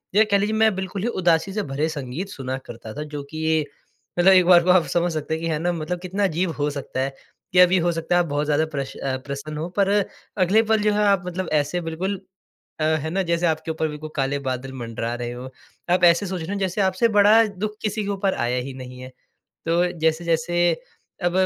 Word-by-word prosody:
या 215 - +7
कह 200 - +5
लीजिए 205 +2 0
मैं 220 -1 +4
बिल्कुल 190 +1 -4
ही 220 - -1
उदासी 180 -3 +1
से 210 0 -1
भरे 145 +1 -1
संगीत 150 +5 -5
सुना 130 -5 -4
करता 115 -1 -9
था। 150 - -5
जो 150 -1 -6
कि 155 - -8
ये 160 -1 +2 0.5
मतलब 190 +2 +7
एक 185 -2 +6
बार 175 -1 +7
को 180 - -1
आप 180 -2 +5
समझ 175 0 +2
सकते 155 0 -3
हैं 160 +1 -3
कि 165 - -1
है 155 -2 0
ना, 175 +2 0
मतलब 170 +2 -3
कितना 185 +3 -2
अजीब 180 -1 +1
हो 145 - +1
सकता 140 -2 -5
है 135 0 -2 0.4
कि 180 - +5
अभी 180 +1 +7
हो 175 0 +1
सकता 165 +1 -1
है - - +5
आप - - -6
बहुत 145 +1 0
ज़्यादा 150 +1 +2
प्रश 140 -2 -4
अ, 130 -1 -2
प्रसन्न 145 +2 -5
हो 160 +3 -3
पर 195 -1 +4 0.6
अगले 210 +5 +4
पल 220 -1 +2
जो 210 0 +3
है 210 0 +2
आप 195 -3 +3
मतलब 180 +1 -4
ऐसे 160 +5 -3
बिल्कुल 180 +4 -3 0.6
अ, - - 0
है 155 0 +1
ना, 190 +3 0
जैसे 170 0 0
आपके 160 0 -1
ऊपर 160 0 -1
भी 150 -1 -6
कोई 155 +1 -8
काले 140 0 0
बादल 130 +1 -4
मंडरा 115 0 -4
रहे 120 0 -4
हों। 125 +2 -7 0.4
आप 180 - +1
ऐसे 170 +3 +5
सोच 185 -2 -4
रहे 160 - -6
हैं 200 - -2
जैसे 190 +1 -1
आपसे 190 +4 +2
बड़ा 210 +3 +7
दुःख 210 +1 -4
किसी 215 0 -1
के 200 - -4
ऊपर 195 -1 0
आया 125 +1 0
ही 135 - -6
नहीं 125 -1 -9
है। 130 - -8 0.6
तो 170 +2 +3 0.2
जैसे-जैसे 165 +1 +1 0.6
अब 175 - +2
170 Hz, 240 wpm, -23 LUFS, 150-190 Hz, 0.6 s, या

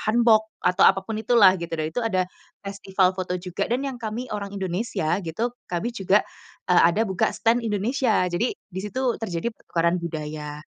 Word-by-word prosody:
Hanbok 220 0 +4 0.2
atau 180 +1 +3
apapun 195 +3 +2
itu 240 +3 0
lah, 190 -3 +8
gitu. 170 -1 -4
Dan 155 - -1
itu - - -1
ada 185 -5 +1 0.4
festival 195 -1 +1
foto 185 -1 -3
juga 180 0 -3
dan 250 +3 +1
yang 270 - -3
kami 230 +3 -4
orang 200 -1 -4
Indonesia 185 -2 -1
gitu, 175 +9 -2 0.2
kami 180 +8 -1
juga, 195 -1 +3 0.5
eee, 180 - +6
ada 210 +6 +1
buka 190 -1 +1
stand 230 +2 +3
Indonesia. 220 +1 +1
Jadi, 210 +8 0
di 190 -1 -8
situ 245 +4 -1
terjadi 180 +1 -2
pertukaran 170 +1 0
budaya. 150 -2 -5
195 Hz, 175 wpm, -24 LUFS, 175-225 Hz, 0.5 s, lah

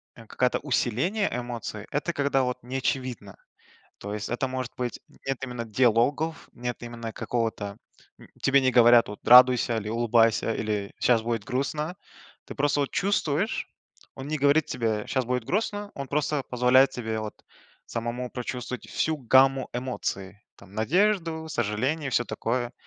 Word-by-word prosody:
а, 115 - -13
какая-то 125 +2 +1
усиление 145 - 0
эмоции- 120 -3 -5
это 150 +4 -1
когда, 140 -2 +1
вот, 125 0 -1
не 130 +2 -4
очевидно. 125 -6 -3 0.6
То 100 +1 -6
есть 105 0 -4
это 120 +2 -1
может 130 -1 -4
быть, 125 -1 -4
м, - - -22
нет 135 -1 -1
именно 125 -2 -4
диалогов, 125 +7 +1
нет 120 0 -4
именно 115 -1 -6
какого-то, 110 -4 -3 0.4
м, - - -15
тебе 140 0 +4
не 130 - +3
говорят, 120 -1 +6
вот: 105 - -10
радуйся, 125 -2 +7
или 105 -1 -5
улыбайся, 115 0 +2
или 105 -2 -2
щас 120 -3 +4
будет 115 -2 -2
грустно, 150 - -2 0.5
ты - - -9
просто, 145 +1 +1
вот, 140 - -1
чувствуешь. 195 0 0 0.5
Он 135 +1 -7
не 155 0 -1
говорит 145 +2 +3
тебе: 110 -4 -1
щас 130 -2 0
будет 125 -1 -1
грустно, 205 - -2
он 140 -1 -5
просто 150 0 0
позволяет 125 +2 +4
тебе, 110 -3 -4
вот, 110 -1 -5 0.5
самому 120 +2 -4
прочувствовать 125 -1 -5
всю 160 0 0
гамму 135 0 +4
эмоций, 105 -6 -4 0.2
там, 100 0 -16
надежду, 165 - +1
сожаление, 130 +6 -1
и - - -4
всё 120 - +2
такое. 120 +2 -2
125 Hz, 155 wpm, -26 LUFS, 115-140 Hz, 0.6 s, радуйся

